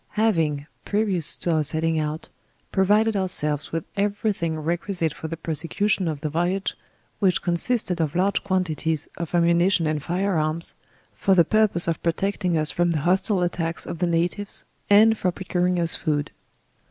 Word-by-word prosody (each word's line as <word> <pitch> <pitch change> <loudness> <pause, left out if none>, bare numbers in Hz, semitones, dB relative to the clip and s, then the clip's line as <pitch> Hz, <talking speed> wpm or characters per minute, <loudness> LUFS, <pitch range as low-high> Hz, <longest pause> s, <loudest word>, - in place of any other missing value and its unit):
Having 170 -9 +2
1, 140 +1 -12 0.2
previous 200 -6 0
to 175 - -1
our 160 -1 +2
setting 160 +2 0
out, 155 +1 -4 0.4
pro 190 - +2
vided 215 +2 +3
ourselves 150 -6 -1
with 165 -1 -2
every 205 +1 0
thing 165 -4 -3
requisite 170 +1 -1
for 160 - -7
the 165 +1 -5
prosecution 165 +5 0
of 150 -3 -3
the 155 - -2
voyage, 175 +5 -1 0.5
which 190 -2 +2
consisted 180 0 0
of 155 -1 -2
Urge 190 +3 +1
quantities 160 -5 -1
of 170 +1 -4
ama 170 0 +4
nition 170 0 +3
and 155 -1 -1
fire 180 +2 0
arms, 155 +2 +2 0.4
for 195 - +2
the 170 -2 +5
purpose 215 -3 +2
of 165 -2 -1
protecting 180 +1 0
us 155 -1 +2
from 175 0 +1
the 160 -3 0
hostile 185 +3 +1
attacks 165 -2 -1
of 165 - -6
the 180 - +1
natives, 175 +4 0 0.3
and 215 +2 +6
for 180 - +1
procuring 180 0 -1
us 165 -1 +2
food. 150 -3 -2
175 Hz, 175 wpm, -24 LUFS, 160-195 Hz, 0.5 s, and